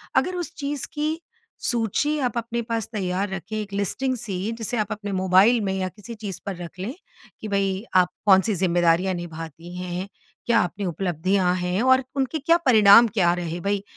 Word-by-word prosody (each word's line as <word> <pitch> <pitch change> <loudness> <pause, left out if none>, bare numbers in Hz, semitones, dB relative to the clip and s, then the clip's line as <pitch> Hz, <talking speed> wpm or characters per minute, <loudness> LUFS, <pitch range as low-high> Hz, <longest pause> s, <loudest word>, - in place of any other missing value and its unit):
अगर 365 - +2
उस 350 -2 -4
चीज़ 285 -1 -3
की 310 +2 -1 0.4
सूची 240 +6 0
आप 240 -1 -2
अपने 235 0 -2
पास 230 -2 -3
तैयार 190 -1 -1
रखें 190 +3 -6
एक 210 -2 -5
लिस्टिंग 230 +7 -1
सी, 205 -2 -3
जिसे 230 +1 -3
आप 215 -1 -1
अपने 210 -1 -4
मोबाइल 190 +5 +4
में 195 -2 -1
या 190 -1 -1
किसी 210 +5 -10
चीज़ 205 -4 -6
पर 200 -2 -3
रख 175 0 -9
लें, 205 +7 -4 0.5
कि 220 - -5
भई 195 -1 0
आप 180 -1 +5 0.2
कौन 190 -2 +7
सी 215 +1 -1
ज़िम्मेदारियाँ 175 0 +2
निभाती 165 0 -7
हैं 180 0 -5
हैं, 185 +2 -3 0.4
क्या 235 -1 +4
अपनी 195 +3 -4
उपलब्धियाँ 180 +1 0
हैं? 180 +2 -1
और 260 +1 +4
उनके 275 +3 -1
क्या 330 +4 +4
परिणाम 220 -1 +8
क्या 190 -5 +2
रहे? 175 -1 -4
भई, 200 +2 -1
200 Hz, 190 wpm, -24 LUFS, 180-230 Hz, 0.5 s, परिणाम